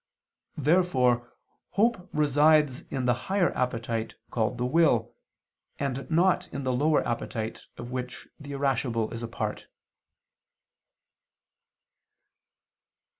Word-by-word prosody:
Therefore 130 -7 +2 0.4
hope 205 -3 +1
resides 150 -1 +3
in 130 -2 -2
the 120 - +4 0.2
higher 190 -2 +2
appetite 115 -3 -2 0.2
called 115 +1 0
the 120 - -1
will, 125 -5 +3 0.6
and 135 -1 -3
not 180 +2 +2
in 140 - -4
the 130 -1 0
lower 150 +4 +2
appetite, 115 -1 -4
of 120 +1 -7
which 125 0 -5
the 145 -1 -8
irascible 125 -5 0
is 115 - -5
a 115 - -4
part. 115 - -4
130 Hz, 105 wpm, -27 LUFS, 120-155 Hz, 0.6 s, the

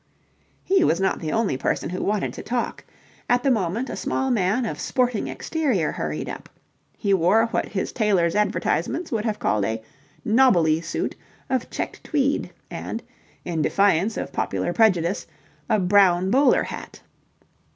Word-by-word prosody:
He 380 -2 +3
was 170 - +2
not 190 0 +1
the 155 -2 -3
only 220 - 0
person 135 - -1
who 185 - -3
wanted 210 -1 -1
to - - -7
talk. 240 +1 -3 0.5
At 245 0 +3
the 275 - +3
moment 220 +3 0
a - - -5
small 265 0 -1
man 220 +2 +1
of - - -4
sporting 250 -4 0
exterior 265 - -1
hurried - - -4
up. - - -7 0.5
He 200 -3 +1
wore 195 +5 +4
what 230 - -1
his 190 - -3
tailor's 190 -7 +2
advertisements 210 +10 0
would 220 -2 -1
have 215 -2 -1
called 105 -1 0
a 110 +2 -2 0.4
"nobbly" 190 -10 +4
suit 165 - -3 0.4
of 260 -2 0
checked - - -5
tweed 280 -1 0 0.2
and - - -5 0.4
in 165 -3 -1
defiance 200 +4 +2
of - - -4
popular 175 - -1
prejudice 190 -4 +2 0.4
a 220 - +4
brown 185 -1 +4
bowler 270 +1 +4
hat. - - -8
210 Hz, 155 wpm, -23 LUFS, 175-245 Hz, 0.5 s, wore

